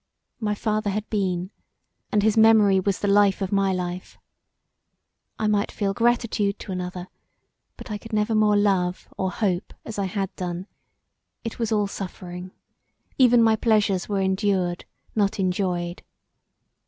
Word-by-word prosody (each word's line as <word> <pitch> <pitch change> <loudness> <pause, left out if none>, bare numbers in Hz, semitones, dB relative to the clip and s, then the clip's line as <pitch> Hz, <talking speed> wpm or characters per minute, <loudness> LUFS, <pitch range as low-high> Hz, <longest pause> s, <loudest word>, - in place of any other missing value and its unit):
My 210 -2 -1
father 215 0 -1
had 210 +2 -3
been 185 -3 -1 0.6
and 210 -1 +2
his 215 0 +3
memory 220 -3 +6
was 195 0 0
the 205 - -2
life 200 -1 +4
of 195 -2 -3
my 195 -1 +2
life. 180 0 -4 1.2
I 215 - -2
might 210 -1 +1
feel 200 -2 -1
gratitude 230 -3 +1
to - - -8
another 180 0 -5 0.7
but - - -9
I 210 - -3
never 215 +1 +1
more 215 -1 +4
could 205 - +3
love 185 -3 0
or 190 - -1
hope 185 -1 -2
as 220 -2 -5
I 200 - 0
had 195 0 -3
done; 180 0 -4 0.8
it 230 0 -6
was 230 -2 -1
all 210 -2 +2
suffering; 180 -2 -7 0.7
even 245 -2 +6
my 225 -1 +5
pleasures 210 -5 +1
were 200 -1 0
endured, 190 -2 0 0.3
not 200 -2 0
enjoyed. 180 -2 -1
200 Hz, 150 wpm, -24 LUFS, 185-215 Hz, 1.2 s, memory